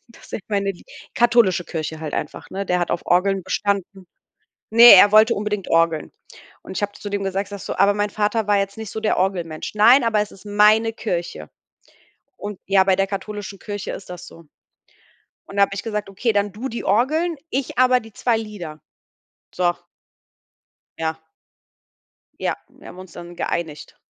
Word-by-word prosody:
dass 230 - -18
ich - - -4
meine 200 -2 0
lie 175 - -18 0.3
katholische 235 -7 +3
Kirche 160 -1 -5
halt 155 -2 -5
einfach, - - -5
ne? 195 +1 -4
Der 180 0 +1
hat 175 - -1
auf 175 - -2
Orgeln 190 +2 +2
bestanden. 195 -1 -2 0.6
Ne, 235 +2 +10
er 200 +2 +7
wollte 215 +2 +6
unbedingt 210 -2 -3
Orgeln. 165 -1 +1 0.5
Und - - -9
ich 175 - -3
habe 205 0 -1
zu 205 - -8
dem 200 -1 -2
gesagt 195 +1 -2
ich - - -17
sage 200 -1 -7
so: - - -5
„Aber 200 +1 +4
mein 205 0 -1
Vater 215 +1 0
war 205 -1 +3
jetzt 195 0 -2
nicht 220 -2 -6
so 220 - -5
der 215 - +1
Orgelmensch. 175 -4 -2
Nein, 235 +5 +6
aber 220 -2 +2
es 210 - -3
ist 195 - -16
meine 210 +2 +4
Kirche.“ 175 - -4 0.9
Und 205 -2 -7
ja, 195 0 +4
bei 190 -1 +3
der 195 +1 +1
katholischen 200 0 -6
Kirche 205 -2 -5
ist - - -9
das 180 -1 -9
so. 165 - -14 1.0
Und 200 - -10
da 200 - +6
hab 200 - 0
ich 200 - -5
gesagt: 210 -2 -4
„Okay, 215 +4 -1
dann 205 0 0
du 230 +6 -5
die 235 - -5
Orgeln, 305 - +1
ich 270 0 -3
aber 255 0 +5
die 225 -3 -15
2 235 +1 0
Lieder.“ 195 -9 -8 0.7
So. 175 -1 +2 1.3
Ja. 160 0 -3 1.2
Ja, - - -1
wir - - -16
haben 180 - -12
uns 185 -2 -11
dann 175 +1 -10
geeinigt. 160 -4 -4
200 Hz, 185 wpm, -21 LUFS, 185-215 Hz, 1.3 s, Ne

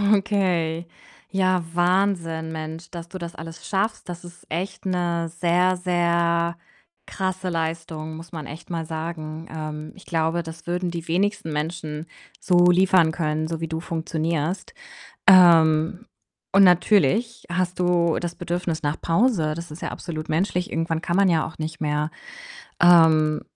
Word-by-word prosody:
Okay, 175 -5 0 0.4
ja, 185 -2 +2
Wahnsinn. 175 -3 +1
Mensch, 160 +1 -6
dass 170 -1 -7
du 185 - -8
das 170 -1 -7
alles 165 0 -9
schaffst. 205 -1 -1
Das 175 0 -7
ist 175 0 -14
echt 185 +4 -4
'ne 170 -2 -1
sehr, 175 +2 +2
sehr 170 -1 +1 0.5
krasse 185 -1 -3
Leistung, 160 -1 -3
muss 165 +1 -10
man 155 -4 -6
echt 155 +4 -10
mal 165 -2 -3
sagen. 160 0 -5
Ähm, 155 0 -6
ich 195 - -16
glaube, 165 0 0
das 165 0 -10
würden 175 +1 -1
die 170 -1 -6
wenigsten 185 -1 0
Menschen 155 0 -4 0.3
so 180 - +2
liefern 180 -3 +4
können, 155 -1 -1
so 165 0 -4
wie 165 - -2
du 160 +1 -3
funktionierst. 165 0 -2 0.5
Ähm, 165 -2 +6 0.5
und 195 +1 +7
natürlich 205 - +3
hast 180 +1 -1
du 175 -2 +2
das 175 -1 -4
Bedürfnis 175 -2 -3
nach 145 +1 -2
Pause, 170 -4 +2
das 170 -1 -7
ist 155 - -9
ja - - -3
absolut 155 -2 -6
menschlich, 180 +2 0
irgendwann 165 0 -1
kann 170 0 -1
man 200 -1 +5
ja 165 -3 +2
auch 160 - -9
nicht 160 +1 -5
mehr. 150 +1 -1 0.7
Ähm, 160 -3 +6
170 Hz, 150 wpm, -23 LUFS, 160-180 Hz, 0.7 s, und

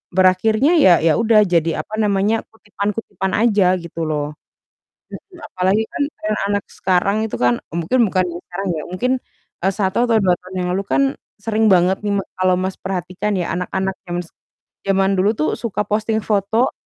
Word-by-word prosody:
berakhirnya 215 - +3
ya 185 -11 +7
ya 165 - +4
udah, 220 -2 +5
jadi, 170 -2 +2
apa 215 - -16
namanya, 205 +2 +1
kutipan-kutipan 200 -2 -4
aja, 200 -5 +3
gitu 170 -1 -7
loh. 150 -1 -2 0.8
Mhm, 370 -4 -11 0.2
apalagi 190 +4 +2
kan, - - -2 0.2
trend 215 0 -1
anak 205 -1 0
sekarang 190 +2 +1
itu - - -5
kan, 120 0 +3
e - - -24
mungkin 180 +10 0
bukan 185 -1 +2
yang 170 +1 -7
sekarang 190 +2 -5
ya, 155 - -5
mungkin, 245 +8 -1 0.5
e - - +4
1 190 -3 0
atau 225 - +4
2 185 -1 +4
tahun 185 +1 -11
yang 180 - -2
lalu 195 - -1
kan 275 - +2 0.3
sering 220 +1 0
banget 180 +1 +3
nih 205 -1 -2
m 200 - +1 0.2
kalau 185 0 +3
Mas 185 +1 -2
perhatikan 190 +2 -3
ya, 175 -2 -2
anak-anak 190 +1 -2 0.2
zams 175 -1 -4 0.6
zaman 195 0 +2
dulu 200 +3 +3
tuh 155 - +1
suka 225 -3 -2
posting 220 +1 0
foto, 215 +4 +1
195 Hz, 180 wpm, -19 LUFS, 180-215 Hz, 0.8 s, ya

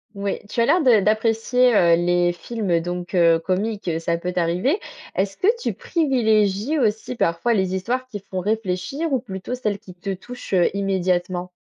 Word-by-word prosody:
Oui, 200 0 -2
tu - - -3
as 230 - +4
l'air 335 +6 +3
de 235 -7 +5
d'apprécier, 225 +3 +2
heu, 170 -3 +5
les 175 0 +2
films, 210 +1 -4
heu, 165 -1 +3
donc, 175 +1 -5
heu, 170 -2 +5
comiques, 200 +4 -2
heu, 165 -1 0
ça 170 0 -1
peut 180 +1 -4
t'arriver 180 - +1 0.4
est-ce 195 +1 -1
que - - -2 0.2
tu - - -1
privilégies 235 - +1
aussi, 220 +1 0
parfois, 170 +6 +1
les 190 -2 0
histoires 250 +7 -2
qui 210 -5 -7
font 190 -1 -6
réfléchir 220 - -2
ou 260 - +2
plutôt 195 0 -6
celles 215 -5 -2
qui 195 -4 -13
te 190 +2 -5
touchent, 245 +2 -9
heu, 180 +2 +2
immédiatement? 185 -2 -1
200 Hz, 185 wpm, -22 LUFS, 180-235 Hz, 0.4 s, de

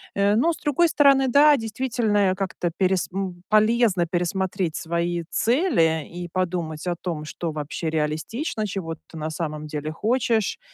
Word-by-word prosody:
Э, 200 +1 +3
но 325 +9 +3
с - - -9
другой 310 +4 +2
стороны, 275 -3 +4
да, 285 +3 +6
действительно, 225 -3 0
а, 185 - -2
как-то 185 -2 -2
перес 185 -2 +1
м, 185 -2 -4
полезно 215 -4 +3
пересмотреть 180 -1 -1
свои 170 +1 -2
цели 220 - +2
и 175 0 -7
подумать 170 -3 -2
о 175 - 0
том, 165 -3 -5
что 165 +1 -4
вообще 150 +2 -4
реалистично, 160 - -2
чего 180 -4 -4
ты 160 0 -13
на 155 +1 -3
самом 155 -2 -4
деле 150 0 -4
хочешь. 225 +3 0
185 Hz, 155 wpm, -24 LUFS, 165-225 Hz, -, да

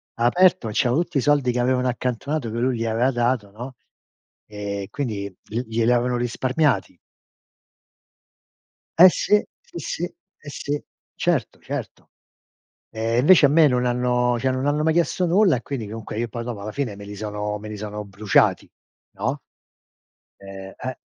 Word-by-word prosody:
Ha 120 - 0
aperto. 180 -2 +4
C'erano 120 +7 +2
tutti 175 -3 -4
i - - +1
soldi 145 -2 +2
che 125 - -2
avevano 125 +1 +1
accantonato 125 +2 -2
che 115 - -4
lui 125 0 +1
gli 115 - -2
aveva 115 +4 +1
dato, 120 -4 0
no, 125 +5 -8 0.7
e 100 -1 -5
quindi 105 -8 -3
gl 120 +4 -4
gliel'avevano 120 +2 +1
risparmiati. 120 - 0 2.0
Eh, 180 +3 +10
sì, 210 +3 +2 0.2
sì, - - -12
sì. 165 - -4
Eh, 175 -3 -9
sì. 145 +1 -4 0.3
Certo, - - -1
certo. - - -7 0.8
Eh, 115 +1 -1
invece, 150 +4 +7
a - - +3
me 155 +2 +5
non 125 -1 +1
hanno 125 0 +1
cioè, 130 +2 0
non 130 +1 -1
hanno 145 +1 +1
mai 160 +1 +3
chiesto 175 +2 +1
nulla 185 -2 +4
e, 120 - -6
quindi, 125 -5 -5
comunque, 110 0 -6
io, 120 +1 -1
poi, 115 0 -6
dopo, 120 -4 -5
alla 105 +1 -6
fine, 125 -6 -3
me 100 - -10
li 100 0 -8
sono 105 0 -4
me 105 +1 -9
li 105 - -6
sono 105 0 -6
bruciati, 100 0 +2 0.5
no, - - -3 1.0
ehm, 95 0 -10
eh. 130 -1 -5
120 Hz, 165 wpm, -23 LUFS, 110-140 Hz, 2.0 s, Eh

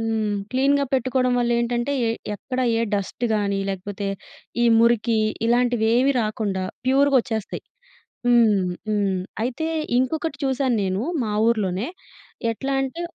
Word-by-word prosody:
హ్మ్. 220 -2 -1 0.2
క్లీన్‌గా 280 +2 +3
పెట్టుకోడం 255 0 +1
వల్లేంటంటే, 240 +2 0 0.2
ఎ 225 - +1 0.2
ఎక్కడ 255 +5 -4 0.2
ఏ - - +1
డస్ట్ 205 +4 -2
గానీ, 200 -1 0
లేకపోతే 195 +1 -4 0.6
ఈ - - +5
మురికీ, 230 -1 +3 0.3
ఇలాంటివేవీ 245 +2 +3
రాకుండా 210 -3 -2 0.2
ప్యూరుగొచ్చేస్తాయి. 260 -5 +1 0.7
హ్మ్. 220 -6 +4 0.2
హ్మ్. 200 -3 +1 0.2
అయితే, 255 +7 -2 0.3
ఇంకొకటి 290 +3 -1
చూశాను 265 -2 +1
నేను 190 +2 -1 0.2
మా 215 - -2 0.2
ఊర్లోనే. 205 -3 0 0.7
ఎట్లా 270 +5 -4
అంటే, 270 +6 -4
235 Hz, 115 wpm, -23 LUFS, 210-260 Hz, 0.7 s, ఈ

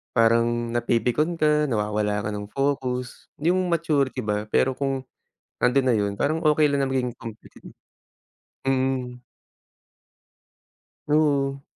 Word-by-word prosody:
parang 115 0 +4 0.3
napipikon 120 +7 +1
ka 150 -1 +2
nawawala 105 -2 -1
ka - - -2
ng 105 0 -5
focus, 130 -2 -2
yung 180 +4 +1
maturity 145 -7 0
ba 105 0 -2
pero 130 - +2
kung 135 0 -2 0.6
nandun 130 +2 +3
na 125 - +4
yun 100 -1 0
parang 155 +3 0
okay 150 0 +4
lang 140 -1 0
na 135 - -1
maging 125 -2 -1
competitive. 115 -2 -11 1.0
Mm. 130 -2 -1 1.9
Oo. 140 -2 +1
130 Hz, 115 wpm, -24 LUFS, 115-145 Hz, 1.9 s, parang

